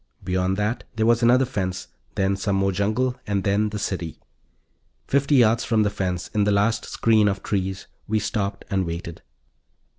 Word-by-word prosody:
Beyond 95 +1 0
that 105 +4 -1
there 110 0 +1
was 115 +1 +3
another 125 +3 +5
fence, 95 -6 -4 0.3
then 95 0 +1
some 100 0 -1
more 95 0 +2
jungle, 110 +7 0
and 100 -2 0
then 105 +1 +1
the 105 - -5
city. 90 -5 -4 0.9
Fifty 140 +1 +2
yards 115 -2 +4
from 110 -2 +2
the 105 - 0
fence, 90 -3 -3
in 105 - +1
the 105 - +2
last 105 +3 +1
screen 110 -2 +3
of 100 -1 -1
trees, 95 -2 -2 0.2
we 110 - +1
stopped 100 -2 -2
and 95 -2 0
waited. 85 0 -6
100 Hz, 175 wpm, -23 LUFS, 95-110 Hz, 0.9 s, another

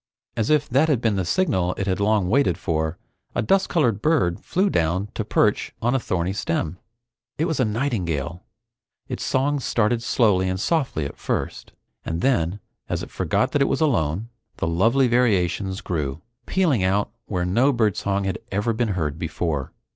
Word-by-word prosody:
As 110 -2 0
if 150 -1 +3
that 140 +6 +3
had 140 -6 +3
been 115 -3 +1
the 95 - 0
signal 90 - +1
it 100 - -1
had 95 -1 -1
long 100 -2 +2
waited 100 - +2
for, 80 -2 -1 0.4
a 120 - +1
dust 195 - +2
colored 120 - +1
bird 140 - +2
flew 190 +3 +1
down 90 - 0
to - - -2
perch - - +1
on 120 +2 +1
a 135 - +2
thorny 90 -4 -1
stem. 85 -2 -2 0.6
It 160 - +1
was 160 -4 -1
a 130 - +3
nightingale. 90 - -2 0.7
Its - - -4
song 140 +2 +1
started 115 -2 +1
slowly 105 -6 +2
and 95 0 -2
softly 135 - 0
at - - -7
first, - - -3 0.3
and 85 +1 -3
then, 100 -8 +1 0.3
as - - -2
it - - -9
forgot - - 0
that 145 - +1
it - - +5
was - - 0
alone, 110 - +1 0.3
the - - -1
lovely 115 +11 +3
variations 100 -5 +1
grew, 75 -6 -3 0.2
pealing 160 - +2
out 100 +2 +1 0.2
where 90 -3 -1
no 120 +10 +3
birdsong 100 -4 0
had 95 -2 -2
ever 105 +4 0
been 110 -2 0
heard 75 -2 -2
before. 80 -4 -2
100 Hz, 175 wpm, -23 LUFS, 90-125 Hz, 0.7 s, it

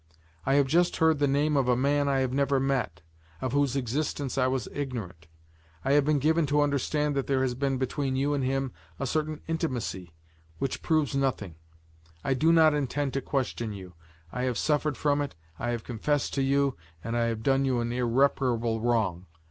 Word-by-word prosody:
I 135 - +4
have 140 -1 +5
just 170 +6 +2
heard 160 -2 +3
the 145 - +3
name 145 +2 +2
of 135 -3 +2
a 125 - +4
man 140 +2 +2
I 135 -1 +2
have 130 -1 -1
never 140 0 +2
met, 130 - -1 0.4
of 130 - -2
whose 140 -1 +1
existence 140 +2 -2
I 130 -1 +2
was 130 -3 -1
ignorant; 110 - -5 0.6
I 135 - +2
have 145 0 +4
been 150 0 +3
given 155 +2 +2
to 145 +1 +2
understand 145 +1 0
that 135 - -1
there 135 -1 +2
has 130 -2 0
been 135 +1 -1
between 130 +1 -1
you 140 +2 +1
and 140 -2 0
him 135 0 -1 0.3
a - - -1
certain 155 +2 -2
intimacy, 125 - -3 0.5
which 135 +9 -3
proves 155 -4 +1
nothing; 130 -10 -1 0.7
I 135 - +1
do 155 +6 +3
not 160 -2 +6
intend 145 -1 -1
to 135 - -1
question 120 -6 -2
you; 95 -3 -9 0.4
I 125 - -3
have 125 -2 -1
suffered 150 -1 0
from 145 -1 +1
it, 145 - -4 0.2
I 120 - -2
have 120 -1 -2
confessed 140 +5 -1
to 140 - 0
you 140 0 +2 0.3
and 115 +1 -3
I 120 0 +2
have 115 -1 -2
done 135 +1 +3
you 130 -3 +1
an 120 0 -2
irreparable 120 -2 +1
wrong. 105 -7 0
135 Hz, 195 wpm, -28 LUFS, 120-145 Hz, 0.7 s, not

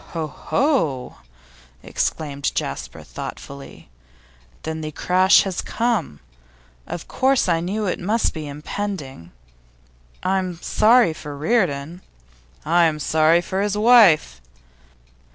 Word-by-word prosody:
'Ho, 165 -2 -2
ho!' 155 - -1 0.7
exclaimed 140 -3 -2
Jasper, - - -4
thoughtfully. 140 0 -9 0.8
'Then 160 0 -4
the 155 0 -5
crash 185 +5 +4
has 190 -3 -3
come. 230 - -2 0.7
Of 170 - -6
course 265 -3 +1
I 170 -2 +2
knew 200 +5 -2
it 180 - -2
must 215 +5 0
be 155 -2 -6
impending. 145 - -6 0.9
I'm 185 -2 -1
sorry 225 -3 +4
for 145 -2 -8
Reardon.' 165 -3 -1 0.6
'I'm 165 -1 +3
sorry 160 +3 +3
for 190 +2 -3
his 205 0 -1
wife. 210 - +5
170 Hz, 105 wpm, -21 LUFS, 150-205 Hz, 0.9 s, wife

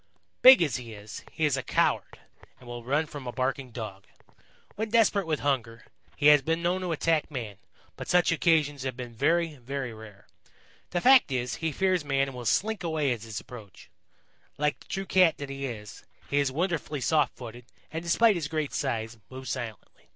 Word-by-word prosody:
"Big 255 -7 +9
as 145 - -1
he 120 -3 -9
is, 105 +1 -9
he 160 - 0
is 145 -3 +2
a 130 - -2
coward - - 0 0.4
and 125 - -16
will 120 -1 -7
run 145 +6 +1
from 145 -4 -9
a - - -3
barking 130 +1 -2
Dog. 110 -5 -8 0.7
When 220 +1 -3
desperate 210 -4 +3
with 155 -2 -1
hunger, 120 -5 -1 0.3
he 145 - -3
has 150 -1 +8
been 165 +4 -1
known 180 +2 +1
to 180 -2 -2
attack 160 0 +1
man, 115 -9 -6 0.4
but - - -7
such 180 -1 +3
occasions 155 -4 +2
have 130 -2 -4
been 120 -2 -7
very, 160 +5 +1
very 130 -1 -5
rare. 110 -2 -13 0.6
The 175 - -1
fact 260 - +6
is, 125 -1 -2
he 160 -1 -2
fears 185 +2 +1
man 135 -1 +1
and - - -10
will 125 -1 -7
slink 210 - +1
sway 155 -6 0
at 115 - -7
his 110 -2 -6
approach. 110 -6 -13 0.7
Like 150 0 0
the - - -18
true 195 0 -3
Cat 185 -4 +4
that 140 -1 -6
he 135 0 -4
is, 105 -4 -8 0.3
he 140 - +3
is 140 -2 +1
wonderfully 160 -1 -2
soft 150 -2 +2
footed 120 -1 -9 0.3
and, 160 - -4
despite 210 +7 +4
his 170 -6 -3
great 155 -1 -3
size, 115 -4 -2
moves 130 0 -7
silently. 120 -5 -7
140 Hz, 195 wpm, -28 LUFS, 120-165 Hz, 0.7 s, Big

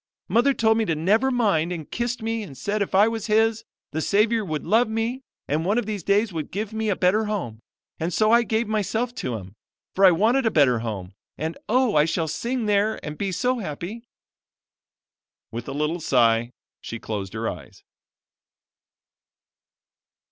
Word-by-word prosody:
Mother 265 +4 +3
told 220 0 +3
me 225 - +1
to 165 - 0
never 210 +12 +2
mind 200 -10 +1
and 165 -4 -5
kissed 240 0 -2
me 225 0 -1
and 145 -11 -9
said 205 - -2
if 195 - -1
I 205 +3 +6
was 225 -1 -3
His, 225 +1 +2 0.3
the 160 - -2
Savior 215 +5 +2
would 155 -5 -4
love 225 +2 +3
me 225 +4 -2 0.3
and 150 +3 0
one 200 +6 +1
of 245 - 0
these 210 -2 -3
days 200 +3 +1
would 155 -3 -4
give 210 +2 -4
me 220 0 -1
a 200 - +2
better 190 +5 +2
home, 180 - -3 0.4
and 165 +2 -1
so 215 +6 +2
I 235 +1 +6
gave 225 0 -1
myself 220 +3 -1
to 125 -2 -3
Him, 95 -3 -8 0.4
for 195 - +2
I 190 - +10
wanted 225 +9 +3
a - - +5
better 140 - +3
home. 100 -5 -5 0.2
And, 160 +2 -3
oh, 250 -1 +3
I 150 0 +5
shall 165 0 -1
sing 235 - -2
there 210 +1 +1
and 150 0 -5
be 195 +3 -2
so 250 +7 0
happy!" 185 +5 -6 1.5
With 115 +1 -6
a - - -4
little 150 +5 -1
sigh 120 -6 +3 0.3
she 115 - -6
closed 100 -4 -5
her 110 0 -3
eyes. 75 -7 -8
200 Hz, 185 wpm, -24 LUFS, 155-225 Hz, 1.5 s, I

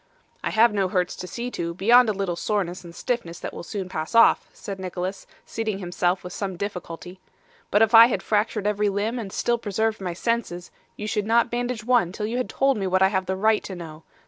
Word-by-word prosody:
'I - - 0
have 225 0 +4
no 195 -2 +1
hurts 180 -1 -1
to 180 - -6
see 240 +5 -5
to, 170 -5 -4
beyond 235 +5 +5
a - - +3
little 195 -3 -2
soreness 180 -1 -2
and 170 -1 -11
stiffness 235 -9 -3
that - - -6
will - - -7
soon 190 +1 -5
pass 160 +2 -5
off,' 230 - +5
said 195 -1 -8
Nicholas, 185 +1 -5 0.2
seating 220 -3 -3
himself 180 -1 -1
with 180 0 -7
some 190 -3 -4
difficulty. 180 -2 -6 0.5
'But 205 +2 +4
if 225 +1 +1
I 230 +1 +10
had 245 - -2
fractured 210 -1 0
every 210 0 +1
limb, 210 +5 -1
and 200 -4 -6
still 235 +4 0
preserved 220 0 -1
my 180 -2 -3
senses, 185 -3 -2 0.3
you 210 - -5
should 210 0 -1
not 235 +1 +3
bandage 240 -1 -2
one 235 -7 +2
till 210 +2 -4
you 230 +3 -2
had 255 - -2
told 270 -2 +2
me 195 -2 -1
what 185 +1 +3
I 190 - +5
have 190 -2 -1
the 190 - -1
right 215 +2 +2
to 190 - -6
know. 160 -3 -9
200 Hz, 225 wpm, -24 LUFS, 180-225 Hz, 0.5 s, I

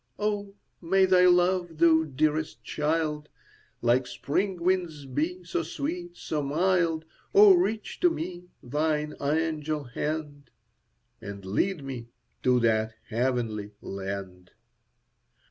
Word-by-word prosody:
Oh, 205 -1 -2 0.3
may 190 +2 +4
thy 180 -1 +5
love, 175 -1 +3
thou 160 -1 +5
dearest 155 +2 -1
child, 150 -1 -1 0.5
Like 125 +2 +3
spring 185 +5 -1
winds 175 -5 0
be, 160 +8 -2
so 170 -1 -2
sweet, 345 - -5
so 155 -2 -2
mild! 165 +2 +1 0.3
Oh, 410 -1 +9
reach 225 - 0
to 355 - +5
me 175 - -5 0.2
thine 150 +3 -1
angel 155 0 -1
hand, 145 +2 -4 0.7
And 100 -1 -8
lead 150 - 0
me 130 -4 -6 0.3
to 125 -1 +3
that 110 -1 +1
heavenly 115 -3 -1
land! 95 -2 -6
155 Hz, 110 wpm, -27 LUFS, 130-180 Hz, 0.7 s, Oh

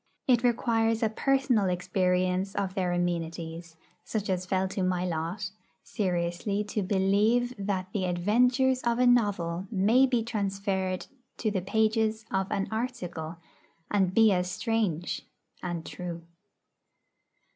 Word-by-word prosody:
It 245 -3 +4
requires 225 -2 +2
a 220 - +3
personal 255 -4 +2
experience 180 +1 0
of 195 -2 -1
their 185 -3 0
amenities, 170 -1 -3 0.3
such 210 -3 -2
as 180 0 -2
fell 190 +1 +1
to 195 - -3
my 185 -1 0
lot, 175 +3 -3 0.3
seriously 180 +1 -1
to 210 - -1
believe 205 +6 +2
that 195 -2 -2
the 190 -3 0
adventures 245 +9 +2
of 235 -1 +1
a 250 - +3
novel 200 -7 +2
may 225 +6 +4
be 245 -3 +1
transferred 195 -4 -2 0.3
to 215 - 0
the 190 -3 -1
pages 220 +2 +1
of 190 0 0
an 195 - 0
'article,' 180 -9 -4 0.5
and 190 -2 +2
be 225 -2 +6
as 180 -1 +1
strange 210 -5 -1 0.4
and 175 -2 -4
true. 175 -2 -6
195 Hz, 130 wpm, -28 LUFS, 180-225 Hz, 0.5 s, be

